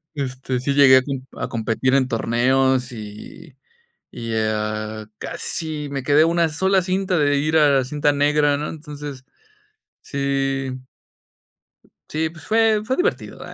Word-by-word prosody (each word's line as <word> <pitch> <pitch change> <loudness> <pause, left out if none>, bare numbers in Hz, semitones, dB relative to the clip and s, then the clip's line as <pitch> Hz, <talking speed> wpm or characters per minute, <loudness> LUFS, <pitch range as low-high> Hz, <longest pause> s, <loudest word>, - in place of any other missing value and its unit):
este, 130 -2 -3
sí 140 +2 -1
llegué 135 -2 +7
a - - +4
com 135 0 -4 0.2
a - - -1
competir 115 +3 0
en 135 -2 +3
torneos 130 +2 +1
y 110 +6 -10 0.6
y, 115 -1 -5
a 110 0 -2
casi 155 -3 -4
me 135 -2 -4
quedé 145 +2 +5
a - - +5
una 170 0 +2
sola 190 +5 +2
cinta 185 0 0
de 145 -1 +2
ir 155 +3 +1
a 150 -1 +5
la 135 -2 +3
cinta 145 +2 +1
negra, 145 0 +2
¿no? 150 +1 -4
Entonces, 145 -3 -8 0.8
sí 135 -1 -2 1.4
sí, 160 +1 -1
pues 160 -2 -14
fue 220 +1 +3
fue 255 +4 -1
divertido, 415 +7 -1
ah, - - -10
140 Hz, 150 wpm, -21 LUFS, 130-155 Hz, 1.4 s, llegué